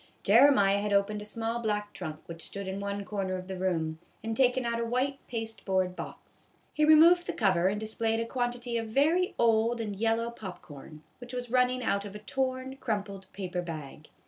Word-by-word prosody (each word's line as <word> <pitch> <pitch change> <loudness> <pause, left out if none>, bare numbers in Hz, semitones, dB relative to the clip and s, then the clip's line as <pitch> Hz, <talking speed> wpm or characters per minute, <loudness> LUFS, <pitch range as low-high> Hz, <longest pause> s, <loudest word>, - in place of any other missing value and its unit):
Jeremiah 205 -3 +6
had 205 0 -2
opened 200 +1 +1
a - - -7
small 225 +2 -2
black 210 -2 -2
trunk 155 -5 -6
which 165 -1 -9
stood 200 +2 -4
in 190 +1 -3
one 200 0 -3
corner 195 -1 -2
of 185 0 -6
the 190 - -4
room, 165 -4 -1 0.2
and 225 0 -2
taken 255 0 +3
out 235 0 -1
a - - 0
white 255 +4 -1
pasteboard 195 -6 -2
box. - - -10 0.2
He 305 - +1
removed 330 +3 +7
the - - -2
cover 185 -5 +2
and 205 +2 0
displayed 225 +1 0
a 230 - -1
quantity 245 -1 -2
of 225 - -4
very 315 +10 +2
old 230 0 +3
and 210 -3 -3
yellow 225 +2 0
pop 195 -6 -8
corn, 150 +1 -12 0.2
which 245 0 -10
was 245 -1 -5
running 250 0 +2
out 200 -2 0
of 205 0 -8
a 210 0 -10
torn, 260 +1 -2
crumpled 200 -6 -4
paper 185 -2 -4
bag. 155 -3 -8
220 Hz, 200 wpm, -29 LUFS, 195-245 Hz, 0.2 s, removed